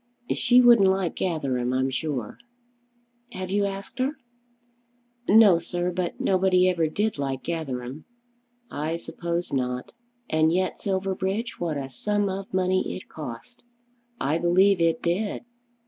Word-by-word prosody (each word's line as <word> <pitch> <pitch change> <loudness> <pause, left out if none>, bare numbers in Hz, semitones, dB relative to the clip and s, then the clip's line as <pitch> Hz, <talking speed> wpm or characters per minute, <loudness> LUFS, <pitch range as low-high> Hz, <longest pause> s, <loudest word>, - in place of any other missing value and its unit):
"She 250 0 +5
wouldn't 235 -5 +7
like 190 -2 0
Gatherum, 130 -8 -1
I'm 130 +1 +1
sure." 130 -4 -3 0.9
"Have 185 -1 -5
you 200 0 +2
asked 200 +6 -6
her?" 270 +3 0 1.1
"No, 205 -5 +7
sir. 175 +1 -2
But 180 -1 -3
nobody 185 -1 +3
ever 170 -3 +2
did 205 +2 -1
like 135 -2 -3
Gatherum." 140 -4 -4 0.7
"I 155 +3 -2
suppose 170 0 -4
not. 125 -1 -2 0.4
And 155 0 +2
yet, 185 +2 0
Silverbridge, 195 +3 -2
what 165 -4 -2
a 135 -1 -4
sum 205 +10 -1
of 195 +1 -5
money 185 0 0
it - - -10
cost!" 150 - -9 0.6
"I 155 -1 0
believe 180 +2 +4
it 165 -1 +1
did." 195 +7 -1
175 Hz, 130 wpm, -25 LUFS, 155-195 Hz, 1.1 s, wouldn't